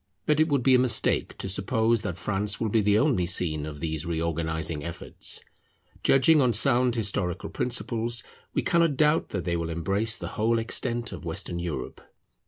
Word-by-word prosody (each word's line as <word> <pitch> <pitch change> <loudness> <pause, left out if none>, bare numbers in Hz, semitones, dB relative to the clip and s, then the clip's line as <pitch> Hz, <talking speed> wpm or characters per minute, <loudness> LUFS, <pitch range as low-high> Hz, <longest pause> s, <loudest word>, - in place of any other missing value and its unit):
But 150 0 +2
it 155 - +4
would 140 -4 +1
be 130 - +5
a 125 - +6
mistake 125 -3 +1
to - - -4
suppose 110 +4 +1
that 95 -5 -4
France 100 +2 -1
will 110 - -1
be 110 +1 +2
the 105 0 +3
only 110 - +1
scene 80 -4 +1
of 75 -1 -8
these 80 0 -2
reorganizing 80 -2 -2
efforts. 85 +1 -3 0.6
Judging 145 +3 +5
on 125 -3 +2
sound 125 +1 +4
historical 100 -4 -1
principles, 120 -1 -1 0.3
we - - -1
cannot 165 -5 +2
doubt 150 +1 +2
that 95 -4 -4
they 85 - -1
will 85 -1 -3
embrace 100 +7 -1
the - - -6
whole 115 +2 0
extent 120 +1 -1
of 90 -5 -8
Western 85 +1 -3
Europe. 80 -7 -5
105 Hz, 180 wpm, -26 LUFS, 85-120 Hz, 0.6 s, a